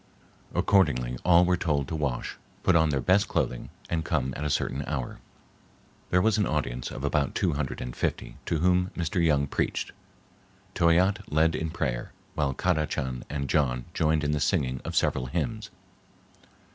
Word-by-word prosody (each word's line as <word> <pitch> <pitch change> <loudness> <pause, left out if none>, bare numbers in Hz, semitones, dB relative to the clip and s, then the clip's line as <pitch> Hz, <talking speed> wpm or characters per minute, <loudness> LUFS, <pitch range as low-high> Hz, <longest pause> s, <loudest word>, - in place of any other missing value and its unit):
Accordingly 60 -11 +2
all 90 0 +6
were 90 0 +3
told 75 -6 0
to 80 - -3
wash, 70 -6 -2 0.3
put 90 - +4
on 80 -1 +4
their 70 -2 0
best 95 +9 +3
clothing, - - -2 0.2
and 80 -2 -1
come 65 -4 -1
at 75 - -4
a 75 - -1
certain 70 -1 -1
hour. 70 -5 -4 0.9
There 90 0 +3
was 110 -1 +3
an 100 - +2
audience 65 -5 -2
of 65 - -7
about 70 -1 0
two 90 -4 +1
hundred 70 -2 -3
and 60 0 -5
fifty, - - -3
to 85 - +1
whom 90 +2 +2
Mr. 85 +1 0
Young 75 -4 +3
I - - 0
preached. - - -2 0.8
Toyatte 90 +4 +2
led 80 +2 +3
in 80 +1 -2
prayer, 65 -7 -3 0.2
while 70 -3 0
Kadachan 75 -7 -1
and 70 -2 -3
John 65 -4 +1
joined 80 -1 +1
in 75 - +1
the 75 - 0
singing 65 -2 0
of - - -5
several 65 -1 +1
hymns. 100 - -3
75 Hz, 170 wpm, -27 LUFS, 65-85 Hz, 0.9 s, all